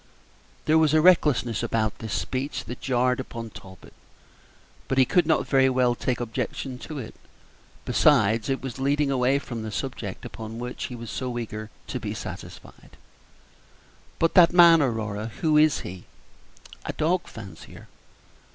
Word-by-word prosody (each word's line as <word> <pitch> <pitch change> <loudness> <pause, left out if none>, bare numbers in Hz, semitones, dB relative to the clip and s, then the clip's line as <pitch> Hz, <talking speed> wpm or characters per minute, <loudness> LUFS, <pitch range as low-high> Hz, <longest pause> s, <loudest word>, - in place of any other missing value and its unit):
There 155 +1 +4
was 155 -1 +3
a - - +6
recklessness 150 - +3
about 110 -2 -1
this 110 -2 -4
speech 130 -1 -3
that 120 - -8
jarred 125 0 +1
upon 115 -3 -6
Talbot, 95 -1 -13 0.9
but 135 - -1
he 130 - +6
could 175 +5 +2
not 160 - +2
very 135 -1 +3
well 125 -1 +2
take 120 0 -2
objection 125 +2 -4
to 155 +5 -7
it; 115 -5 -7 0.7
besides, 115 -6 +3
it 135 -1 -1
was 130 -1 -6
leading 140 +1 +1
away 130 +1 +2
from 120 -5 -6
the 110 - -5
subject - - -5
upon 110 0 -8
which 125 +1 -5
he 125 - -6
was 115 -1 -8
so 125 -2 -4
eager 110 -2 -5 0.2
to - - -4
be - - -5
satisfied. - - -10 1.2
"But 165 - +2
that 175 -2 +7
man, 170 -2 +7
Aurora, 110 -5 -2
who 155 -2 +2
is 155 -1 +4
he?" 90 0 -9 0.8
"A - - -4
dog 175 +3 0
fancier." 105 -4 -11
125 Hz, 155 wpm, -25 LUFS, 115-145 Hz, 1.2 s, that